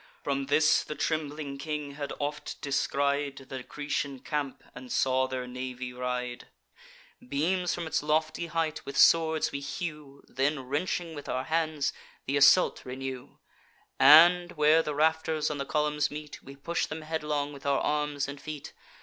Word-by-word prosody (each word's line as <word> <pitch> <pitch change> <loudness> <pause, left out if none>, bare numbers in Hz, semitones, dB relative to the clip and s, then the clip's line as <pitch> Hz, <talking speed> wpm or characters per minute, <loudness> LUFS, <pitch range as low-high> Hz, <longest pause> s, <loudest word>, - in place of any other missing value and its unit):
From 140 -1 -1
this 155 +2 +4
the 150 - -6
trembling 150 -2 -3
king 150 -1 -4
had 140 0 -5
oft 145 +1 -4
descried 140 0 0
The 130 -1 -5
Grecian 140 0 -3
camp, 145 -2 -3
and 125 0 -10
saw 130 0 +2
their 130 -1 -4
navy 125 0 -6
ride. 125 -1 -4 0.8
Beams 180 +5 0
from 175 - -4
its 160 0 0
lofty 155 +2 0
height 165 -1 -2
with 140 0 -6
swords 160 +1 +5
we 140 - -3
hew, 150 -1 -6
Then, 135 +2 0
wrenching 165 +5 -2
with 145 -2 -8
our 130 - -1
hands, 160 -3 0 0.3
th' 135 - -1
assault 145 +6 +5
renew; 130 0 -7 0.6
And, 175 +3 +8
where 155 +1 +5
the 150 -2 -4
rafters 160 0 +1
on 145 - -4
the 140 - -2
columns 150 +2 +1
meet, 150 0 -8
We 135 - -12
push 170 +5 -2
them 155 +1 -6
headlong 150 -2 -2
with 140 0 -8
our 140 -1 +3
arms 150 -2 -1
and 140 0 -8
feet. 150 -2 -7
145 Hz, 160 wpm, -29 LUFS, 140-155 Hz, 0.8 s, And